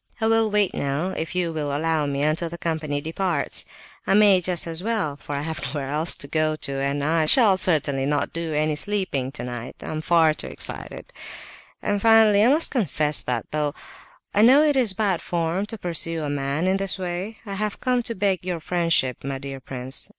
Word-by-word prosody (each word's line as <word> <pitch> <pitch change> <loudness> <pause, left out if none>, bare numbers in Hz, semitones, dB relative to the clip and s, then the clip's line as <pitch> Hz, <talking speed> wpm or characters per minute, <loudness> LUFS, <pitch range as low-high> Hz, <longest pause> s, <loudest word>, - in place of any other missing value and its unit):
I 220 - 0
will 225 0 +3
wait 205 -2 +1
now, 140 +7 -2
if 160 -1 -5
you 175 -2 0
will 150 -2 -2
allow 160 -1 0
me, 140 0 -1
until 155 +3 0
the 170 - -8
company 155 -4 -2
departs; 165 0 -2 0.4
I - - +3
may 200 -3 +5
just 180 -1 -1
as 165 0 -4
well, 205 -9 -1
for 145 0 -7
I 140 - -3
have 160 0 -4
nowhere 135 +1 -4
else 155 +4 +3
to 140 - -6
go 155 +1 +1
to, 140 -3 -4
and 140 +1 -1
I 160 +1 +1
shall 215 0 +7
certainly 150 -7 0
not 145 0 -1
do 165 -1 -3
any 155 0 0
sleeping 170 -8 -1
tonight; 120 -3 -6
I'm 155 0 -4
far 160 -1 +4
too - - -6
excited. - - -6 0.7
And 205 -1 -1
finally, 220 -2 +5
I 235 - +5
must 305 +4 +3
confess 155 - +1
that, 120 -3 -2
though 150 -1 -1 0.6
I 205 - +3
know 260 +7 +7
it 295 -2 +2
is 240 -7 +3
bad 195 -3 0
form 170 +3 -2
to 225 - -7
pursue 165 -3 -2
a 145 - -3
man 140 +3 -2
in 190 +1 +2
this 195 -1 -2
way, 185 +4 -4
I 200 - -6
have 210 +1 -3
come 250 -1 +1
to 230 -1 -3
beg 190 -2 0
your 180 -2 -3
friendship, 165 -6 0
my 135 0 -3
dear 135 0 -7
prince. 130 0 -5
165 Hz, 205 wpm, -23 LUFS, 145-195 Hz, 0.7 s, shall